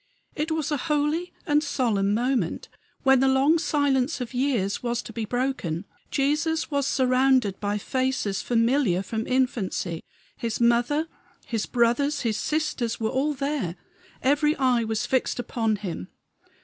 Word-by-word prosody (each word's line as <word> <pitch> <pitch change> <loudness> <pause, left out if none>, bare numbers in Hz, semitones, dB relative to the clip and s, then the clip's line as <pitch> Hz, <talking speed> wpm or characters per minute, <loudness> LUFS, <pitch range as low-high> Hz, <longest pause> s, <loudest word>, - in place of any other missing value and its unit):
It 300 +2 -2
was 315 -1 -1
a 295 - +1
holy 300 +4 0
and 295 -3 +2
solemn 220 -9 +1
moment, 240 -6 -1 0.3
when 270 -1 +5
the 270 - +3
long 275 +5 +4
silence 285 -3 +1
of 250 0 -5
years 245 -7 0
was 235 -1 -2
to 225 - -9
be 225 -1 -3
broken. 230 -8 -2 0.2
Jesus 300 +4 0
was 280 -1 +1
surrounded 255 -5 +2
by 205 0 -1
faces 255 -4 -1
familiar 230 -5 +2
from 220 +3 -3
infancy. 225 -9 -1 0.3
His 230 -2 -3
mother, 240 +7 +2 0.4
his 225 -4 -2
brothers, 250 +5 +2
his 225 -3 0
sisters, 300 -7 -1
were 220 -1 0
all 285 +3 0
there; 275 - -2 0.5
every 295 +3 +3
eye 255 -3 +2
was 220 -1 -1
fixed 260 -1 0
upon 225 -2 0
him. 180 - -5
255 Hz, 145 wpm, -25 LUFS, 225-285 Hz, 0.5 s, when